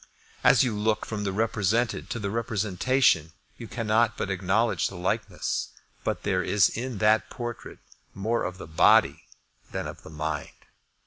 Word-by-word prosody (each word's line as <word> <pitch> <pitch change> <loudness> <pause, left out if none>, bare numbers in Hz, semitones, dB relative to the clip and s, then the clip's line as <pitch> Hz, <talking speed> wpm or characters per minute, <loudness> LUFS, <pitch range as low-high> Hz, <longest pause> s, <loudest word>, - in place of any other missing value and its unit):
As - - +6
you 120 -4 -1
look 105 +1 0
from 105 -2 -4
the 100 - 0
represented 110 +2 0
to 120 - -3
the 100 -3 -3
representation 110 - +1 0.2
you 115 - -8
cannot 115 +1 +1
but 95 - -2
acknowledge 95 +5 +1
the 95 - -9
likeness; 90 +1 -2 0.3
but - - -2
there - - +1
is 105 -3 +3
in 120 0 -4
that 110 +2 +3
portrait 120 -2 -7 0.4
more 110 +4 -1
of 90 +1 -4
the - - -8
body 80 0 +4 0.4
than - - -3
of - - -8
the - - -12
mind. 75 -1 -3
105 Hz, 155 wpm, -26 LUFS, 95-115 Hz, 0.4 s, As